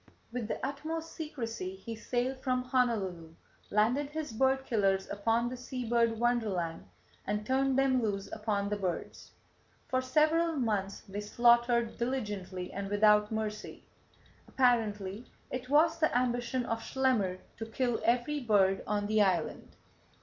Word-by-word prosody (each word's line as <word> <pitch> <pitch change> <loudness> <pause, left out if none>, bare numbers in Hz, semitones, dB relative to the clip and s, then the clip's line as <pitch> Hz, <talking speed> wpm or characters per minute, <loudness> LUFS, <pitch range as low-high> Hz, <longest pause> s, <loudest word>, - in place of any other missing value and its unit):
With 235 -2 -3
the - - -2
utmost 320 +4 -4
secrecy 230 - -5
he 225 +4 -7
sailed 250 +3 -2
from 255 -1 0
Honolulu, 200 -11 -1 0.3
landed 245 +7 +2
his 305 -4 -5
bird 265 +3 +2
killers 195 -4 +1
upon 225 +4 +1
the 250 - -4
sea 250 -1 -6
bird 230 -1 +2
wonderland, 200 - 0 0.4
and 210 +1 -1
turned 265 +2 +2
them 265 -2 +3
loose 200 -3 -1
upon 210 -2 -1
the 210 - -1
birds. 185 -4 -4 0.6
For 255 -1 +1
several 310 +5 +2
months 210 -8 -1
they 200 0 -6
slaughtered 235 +2 +3
diligently 205 -7 -3
and 195 0 -4
without 210 +1 +4
mercy. 215 -1 -4 0.6
Apparently 220 -4 +1 0.2
it 255 0 -5
was 320 +3 +4
the 310 -6 +2
ambition 245 0 0
of 225 -1 -2
Schlemmer 235 -10 +1 0.2
to 225 - -5
kill 240 +1 -1
every 245 +5 +1
bird 200 -6 +3
on 205 -1 0
the 215 +1 +2
island. 190 -4 0
230 Hz, 140 wpm, -31 LUFS, 205-255 Hz, 0.6 s, without